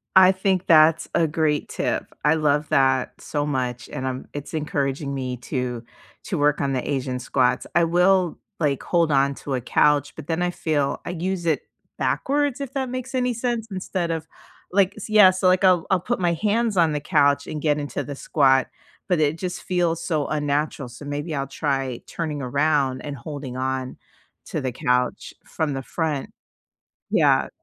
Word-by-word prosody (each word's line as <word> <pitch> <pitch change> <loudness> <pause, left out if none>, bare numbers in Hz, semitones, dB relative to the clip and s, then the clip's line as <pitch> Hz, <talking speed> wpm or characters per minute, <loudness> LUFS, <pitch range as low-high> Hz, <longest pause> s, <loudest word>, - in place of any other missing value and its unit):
I 190 0 +8
think 190 -1 0
that's 160 0 +5
a 165 -1 +3
great 150 -1 0
tip. - - -1 0.2
I 150 - +5
love 150 -1 +1
that 130 -1 +2
so 145 -1 -2
much, 125 -4 -2
and 130 - -4
I'm 130 0 -4
it's 145 +2 -7
encouraging 140 -2 -2
me 130 -2 -3
to 125 -1 -4 0.4
to 180 - -2
work 145 0 +2
on 140 -1 0
the 130 - -2
asian 130 -2 -2
squats, 125 0 +1
I 170 -1 +5
will 180 +1 +3 0.2
like, 145 -4 0
hold 170 -2 +2
on 140 0 +3
to 140 - -5
a 125 - -2
couch, 145 +3 +2
but 155 -2 -9
then 165 +1 -1
I 180 0 +1
feel, 150 -5 -1
I - - -3
use 180 +1 -3
it 160 -3 +1 0.4
backwards, 285 -1 0
if 275 -2 -5
that 265 -2 -2
makes 255 +1 -5
any 250 -1 +1
sense, 235 -1 -2
instead 185 -2 -2
of 160 -1 -3 0.4
like, 195 +1 +3
s 215 - -7
yeah, 210 -3 +8
so 185 0 0
like 185 +1 +3
I'll 180 -3 +4
I'll 190 - +3
put 240 +5 -2
my 175 -2 +2
hands 215 +5 0
on 165 -3 +4
the 150 - -1
couch 145 -2 +2
and 150 - -5
get 150 -1 +1
into 145 -1 -3
the 145 - -6
squat, 135 -2 +3 0.4
but 180 -4 +1
it 155 +1 +2
just 180 0 -5
feels 170 -2 0
so 155 -4 -1
unnatural, 145 -2 -1
so 120 +4 -11
maybe 145 +3 -4
I'll 140 -2 -2
try 135 -4 -2
turning 155 -4 -4
around 140 0 +1
and 145 -1 -5
holding 140 -1 -7
on, 130 0 -3 0.5
to - - -3
the 130 -1 -2
couch 125 +1 0
from 155 -3 -2
the 135 - -3
front. 155 -2 -2 0.8
Yeah. - - +3
150 Hz, 185 wpm, -23 LUFS, 140-180 Hz, 0.8 s, I